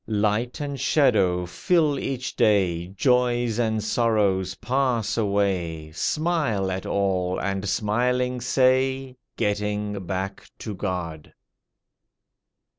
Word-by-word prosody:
Light 110 +3 0
and 140 -2 -4
shadow 105 - +3
fill 150 - +1
each 130 -1 -4
day 90 -5 +2
Joys 120 +2 +1
and 110 -2 0
sorrows 105 -5 +1
pass 120 -2 0
away, 95 -7 -1
Smile 145 - 0
at 95 0 -4
all, 95 -2 0
and 95 0 -2
smiling, 125 +5 0
say, 130 +1 +2 0.2
Getting 105 -1 -2
back 95 +1 -4
to 110 - -6
God. 90 -5 -5
105 Hz, 100 wpm, -24 LUFS, 95-125 Hz, 0.2 s, shadow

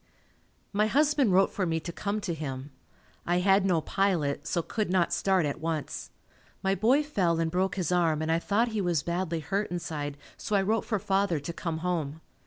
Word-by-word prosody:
My 210 +1 +3
husband 285 -2 +3
wrote 190 +2 +4
for 190 -3 -1
me 165 0 0
to 170 - -5
come 205 +4 -3
to 190 -4 -2
him. 140 -3 -5 0.5
I 175 +1 +1
had 195 +2 +4
no 170 -4 +2
pilot, 160 -6 0
so 170 - 0
could 215 +2 -2
not 180 -2 +2
start 190 -4 +2
at 145 - -3
once. 160 -3 -3 0.5
My 195 0 +2
boy 250 +9 +3
fell 185 - +1
and 165 -1 0
broke 185 +2 0
his 180 -4 -1
arm 165 -3 +2
and 160 - 0
I 165 - +3
thought 220 +7 +1
he 220 -2 -1
was 170 -6 +1
badly 170 -1 -2
hurt 200 +6 -1
inside 150 -4 -4 0.2
so 210 - -2
I 195 - +3
wrote 220 +3 +1
for 215 - 0
father 195 -4 +1
to 170 +4 -5
come 165 -1 -3
home. 160 -4 -1
180 Hz, 200 wpm, -28 LUFS, 160-200 Hz, 0.5 s, wrote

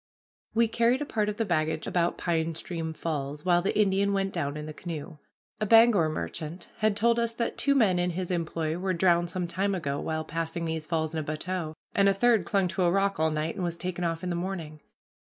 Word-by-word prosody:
We 230 0 +4
carried 235 +5 +2
a - - -5
part 215 -6 0
of 210 - -4
the 225 - 0
baggage 160 -4 0
about 175 -1 0
Pine 165 -1 -1
Stream 165 -1 -4
Falls, 150 -2 -4
while 175 -1 +4
the 195 - -1
Indian 200 0 +3
went 195 0 0
down 145 +1 -2
in 150 - -5
the 155 - -7
canoe. 160 -1 -7 0.4
A 215 - 0
Bangor 225 -7 +6
merchant 160 +2 -5
had 215 -2 +2
told 235 +2 +3
us 235 0 0
that 235 - -2
two 280 0 +2
men 200 -9 +4
in 175 0 +1
his 180 +1 -3
employ 165 -1 -1
were 190 0 0
drowned 175 -1 +3
some 180 0 -2
time 190 +4 0
ago 145 -5 -2
while 160 0 -2
passing 165 +1 -3
these 160 -1 -3
falls 160 -1 -1
in 160 - -1
a - - -2
bateau, 155 +2 -3 0.2
and 200 0 +4
a 195 - +2
third 225 -3 +3
clung 195 -2 +2
to 190 - -2
a 175 - +4
rock 195 +1 +1
all 160 0 +3
night 155 +1 -1
and 190 - -4
was 170 -1 -2
taken 180 0 -4
off 165 0 -1
in 180 - -2
the - - -1
morning. 170 -4 -4
175 Hz, 230 wpm, -28 LUFS, 160-195 Hz, 0.4 s, Bangor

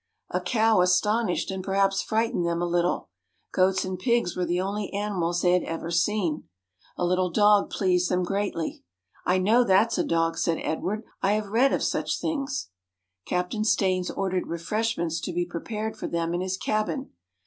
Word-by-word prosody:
A - - 0
cow 220 -4 +3
astonished 210 +2 +2
and 190 -1 -4
perhaps 195 0 +2
frightened 225 -4 0
them 170 0 0
a 175 - 0
little. 175 0 0 0.4
Goats 190 0 +2
and 185 -1 -4
pigs 235 -4 +1
were 180 -1 -1
the 175 +1 0
only 200 +2 -2
animals 185 -4 -1
they 175 - +4
had 180 0 +3
ever 165 +1 -5
seen. 170 -2 0 0.5
A 180 - 0
little 180 +1 +1
dog 205 +3 +4
pleased 180 -2 +1
them 180 0 +1
greatly. 195 -3 -2 0.5
"I 180 - +4
know 215 +7 +4
that's 225 +2 +3
a - - +3
dog," 165 0 0
said 165 -2 +1
Edward; 200 +7 -2 0.2
"I 200 - +3
have 210 -1 -1
read 250 +6 +3
of - - 0
such - - -1
things." 280 -3 -2 0.6
Captain 180 +4 -1
Staines 185 -4 +1
ordered 185 -2 -2
refreshments 170 -1 -1
to 180 - -4
be 175 +1 0
prepared 215 +6 -4
for - - -5
them 170 0 -1
in 175 - -1
his 185 0 -2
cabin. 215 +7 -2
185 Hz, 175 wpm, -26 LUFS, 175-210 Hz, 0.6 s, they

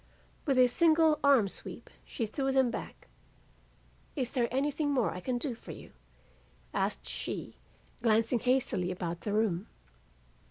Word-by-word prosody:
"With 270 -2 +2
a 255 - +8
single 315 +3 +4
arm 275 -7 +5
sweep - - -8 0.2
she 230 - -3
threw 270 +5 -1
them 265 -2 +3
back. - - -7 1.1
'Is 255 -5 -2
there 245 -3 +1
anything 290 +3 0
more 255 -6 +2
I - - -5
can 250 +6 -2
do 255 +1 -2
for 230 - -10
you?' - - -12 0.8
asked - - -1
she, - - -4 0.5
glancing 230 +1 +3
hastily 245 -7 +1
about 175 -2 -4
the 210 - -3
room. 210 -4 +1
250 Hz, 145 wpm, -31 LUFS, 215-275 Hz, 1.1 s, a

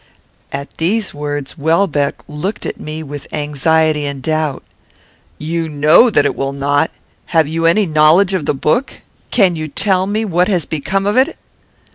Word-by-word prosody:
At 140 +1 -7
these 195 +5 0
words, 145 +1 -5
Welbeck 155 -2 +1
looked 150 +8 -4
at - - -5
me 155 +1 -6
with 145 -1 -9
anxiety 150 +1 +1
and 140 -1 -4
doubt: 155 -3 -1 0.7
"You 165 +1 -3
know 155 - +5
that 145 -9 +2
it 140 - 0
will 135 0 -2
not! 145 +3 +1 0.4
Have 160 -3 +2
you 165 +2 0
any 195 +5 +3
knowledge 160 +4 +4
of 185 - -2
the - - +1
book? 155 - -1 0.3
Can 190 -6 +3
you 155 -1 -4
tell 190 +3 +1
me 215 +2 -1
what 180 -2 +1
has 180 -6 0
become 190 +6 -2
of 205 +4 0
it?" 270 +6 +2
160 Hz, 165 wpm, -16 LUFS, 145-185 Hz, 0.7 s, know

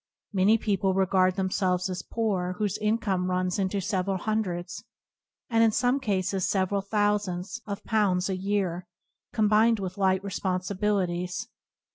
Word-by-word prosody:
Many 200 +3 +4
people 195 -3 0
re 190 0 +3
gard 185 -1 +2
themselves 185 -1 0
as 185 -1 -4
poor 190 -5 -1
whose 205 -2 -1
income 210 -4 0
runs 185 +1 0
into 195 +1 0
several 190 0 -1
hundreds, 185 -4 -3 0.6
and 230 -1 +3
in 225 - +6
some 245 +5 +1
cases 190 -4 0
several 195 0 +1
thousands, 205 -1 -1
of 200 -1 -5
pounds 195 -5 +1
a 190 - -1
year, 185 -2 -1 0.4
com 215 -2 +2
bined 220 +1 +4
with 190 +1 -5
light 190 -1 +2
responsibilities. 185 -1 -1
195 Hz, 140 wpm, -27 LUFS, 185-210 Hz, 0.6 s, in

